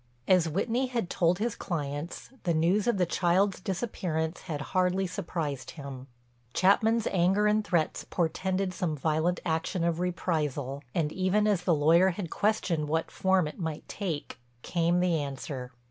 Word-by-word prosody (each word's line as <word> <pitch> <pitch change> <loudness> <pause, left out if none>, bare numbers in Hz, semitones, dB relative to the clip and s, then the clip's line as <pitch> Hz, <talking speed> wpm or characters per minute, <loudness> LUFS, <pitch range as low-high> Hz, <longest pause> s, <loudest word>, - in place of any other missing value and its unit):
As 180 -3 +4
Whitney 230 - 0
had 235 -8 -2
told 175 0 +2
his 225 +3 -1
clients, 150 +1 -4
the 170 -3 0
news 180 +7 +2
of 240 - +2
the 180 - +3
child's 180 +3 +2
disappearance 180 -4 -2
had 155 -5 -4
hardly 185 +1 +2
surprised 160 -6 -4
him. 135 -2 -8 0.5
Chapman's 220 +4 +4
anger 190 +3 +3
and 210 0 +3
threats 170 -6 0
portended 185 +3 0
some 170 -4 -1
violent 160 +4 +1
action 165 +1 -1
of 170 -1 +1
reprisal, 150 -6 -2
and, 155 -3 +1
even 190 +4 +1
as 195 -4 +1
the 170 - +4
lawyer 165 +5 +5
had 175 -2 -4
questioned 180 -7 0
what 160 +1 0
form 190 -3 +2
it 150 - -8
might 160 -3 -4
take, 170 -11 -4 0.2
came 170 0 +1
the 170 -4 +2
answer. 135 -2 -5
175 Hz, 155 wpm, -29 LUFS, 160-190 Hz, 0.5 s, lawyer